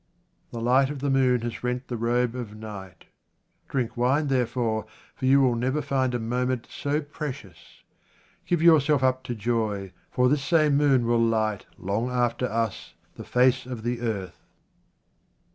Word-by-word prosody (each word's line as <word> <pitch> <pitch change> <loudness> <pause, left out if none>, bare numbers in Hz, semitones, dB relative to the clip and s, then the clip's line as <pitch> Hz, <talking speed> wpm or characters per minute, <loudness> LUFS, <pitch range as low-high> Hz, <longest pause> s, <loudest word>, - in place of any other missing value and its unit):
The 115 - -6
light 130 +3 +3
of 145 - -4
the 140 +1 -1
moon 130 -2 +3
has 120 +1 -5
rent 125 +1 -2
the 120 - -4
robe 120 +1 0
of 120 -4 -6
night. 100 -5 -9 0.6
Drink 125 -4 -2
wine, 135 +5 +1
therefore, 120 -4 0 0.3
for 130 - -5
you 140 +1 +6
will 130 -2 +3
never 130 +5 0
find 130 -4 0
a - - -1
moment 125 +2 -1
so 145 +2 -1
precious. 145 - -8 0.6
Give 175 -2 +1
your 165 -3 +7
self 140 -1 +1
up 130 0 +2
to 120 - -3
joy, 105 -4 -2 0.2
for 125 0 +2
this 145 +2 +2
same 155 -1 +3
moon 140 -4 +3
will 120 0 +2
light 110 -3 0
long 105 +6 -2
after 125 0 0
us 115 -2 -3 0.2
the - - -9
face 125 0 +2
of 120 -4 -6
the 120 0 -2
earth. 100 -7 -3
125 Hz, 165 wpm, -26 LUFS, 115-135 Hz, 0.6 s, your